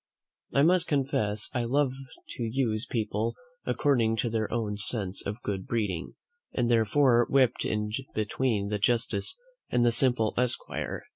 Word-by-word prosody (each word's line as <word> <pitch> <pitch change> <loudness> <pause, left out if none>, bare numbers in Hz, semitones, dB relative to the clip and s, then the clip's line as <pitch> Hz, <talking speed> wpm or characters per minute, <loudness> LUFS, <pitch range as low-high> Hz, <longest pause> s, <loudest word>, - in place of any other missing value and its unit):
I 140 - +4
must 180 +2 +4
confess 110 -7 0
I 120 - 0
love 135 +2 +2 0.4
to 120 - -5
use 115 -1 -1
people 110 0 -1 0.3
according 120 -6 +2
to 115 +1 -1
their 110 -1 -1
own 110 -3 -1
sense 105 -3 -2
of 105 +4 -5
good 95 -2 -3
breeding, 105 -7 -2 0.4
and 120 -1 +1
therefore 120 +2 +4
whipped 130 -3 +3
in 105 0 -1 0.2
between 110 -1 0
the 105 0 -1
justice 115 -1 0 0.3
and 120 -1 +2
the 120 - +5
simple 120 -3 +2
esquire. 125 -1 -2
115 Hz, 145 wpm, -28 LUFS, 105-125 Hz, 0.4 s, the